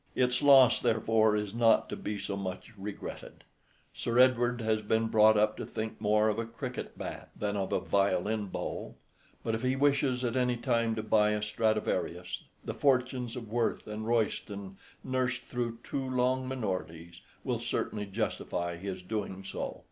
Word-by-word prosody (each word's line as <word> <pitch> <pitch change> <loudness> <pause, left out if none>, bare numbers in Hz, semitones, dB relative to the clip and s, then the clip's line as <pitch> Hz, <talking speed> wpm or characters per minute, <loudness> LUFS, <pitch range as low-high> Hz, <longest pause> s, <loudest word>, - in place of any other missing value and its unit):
Its 125 -1 +2
loss, 135 -4 +7
therefore, 110 -2 +3
is 105 -1 -2
not 115 -1 +4
to - - -4
be 105 - -4
so 100 0 -3
much 95 +2 -5
regretted. 100 0 -8 0.5
Sir 120 0 -2
Edward 125 -1 +4
has 110 -1 +1
been 110 +1 +1
brought 110 0 +6
up 105 +1 +3
to - - -4
think 110 -1 -5
more 105 0 +3
of 110 +1 0
a 115 - -1
cricket 115 0 -6
bat - - -6
than 105 -1 -1
of 95 -2 -2
a - - +2
violin 100 +2 +1
bow; - - -5 0.5
but 115 - -1
if 110 - -1
he 130 +1 +1
wishes 135 -2 +2
at 120 +1 -1
any 125 -1 +2
time 115 -2 +1
to 110 - -3
buy 105 -1 +4
a 105 - -1
Stradivarius, 110 0 -1 0.2
the - - -3
fortunes 125 -3 +1
of 115 -4 -7
Worth 120 0 0
and 110 +1 -5
Royston, 100 -4 -1 0.3
nursed 130 -1 -1
through 120 -2 -3
two 135 -1 -3
long 130 +1 +1
minorities, 90 -9 -4 0.2
will - - -1
certainly 105 -1 -2
justify 95 -4 -2
his 95 0 -5
doing 95 -1 -4
so. - - -5
110 Hz, 170 wpm, -30 LUFS, 105-125 Hz, 0.5 s, loss